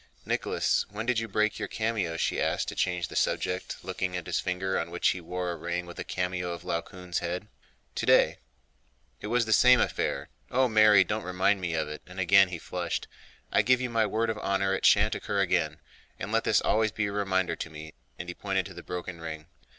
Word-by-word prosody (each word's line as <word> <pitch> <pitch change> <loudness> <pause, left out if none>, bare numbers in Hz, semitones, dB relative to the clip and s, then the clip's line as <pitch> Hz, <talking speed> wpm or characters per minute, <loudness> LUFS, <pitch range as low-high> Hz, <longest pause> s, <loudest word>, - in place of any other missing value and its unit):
"Nicholas, - - +1
when 105 +2 -5
did 125 -2 +2
you 115 - -3
break 105 +1 0
your - - -2
cameo?" 105 -7 -1
she - - 0
asked - - 0
to - - -3
change 90 -2 -1
the - - -10
subject, 90 +1 -1
looking 90 -1 -3
at 90 - -6
his 90 - -1
finger 95 +1 -1
on 85 - -3
which 90 +1 +1
he 90 - -2
wore 90 +1 -3
a - - -4
ring 85 +1 -3
with 85 0 -10
a - - -2
cameo 90 -1 -2
of 85 - -8
Laocoön's 90 +1 -3
head. 90 +4 -4 0.5
"Today—it - - -1
was 115 +1 +2
the 110 - +1
same 125 +2 +7
affair. 70 +1 -1 0.2
Oh, 130 +1 +3
Mary, 110 -3 +6
don't 105 +4 -2
remind 90 +2 +1
me 85 -2 -2
of 80 -1 -1
it!" 75 0 -7
and 90 +1 -9
again 95 +1 +6
he 90 - -4
flushed. - - -4 0.4
"I - - +4
give 125 0 +3
you 125 -1 -3
my 110 -2 +2
word 110 +2 0
of 110 - -5
honor 95 -1 0
it 95 - +3
shan't - - +4
occur - - -2
again, - - +1 0.4
and 95 - -5
let 115 0 +1
this 110 - +3
always 110 0 +2
be 105 +1 -1
a 100 - -2
reminder 95 -4 0
to 80 - -5
me," 80 0 -10 0.2
and 85 - -7
he 90 - -4
pointed 95 0 -1
to 95 - -9
the 85 - -9
broken 90 -1 -6
ring. 80 -2 -6
95 Hz, 220 wpm, -28 LUFS, 85-105 Hz, 0.5 s, same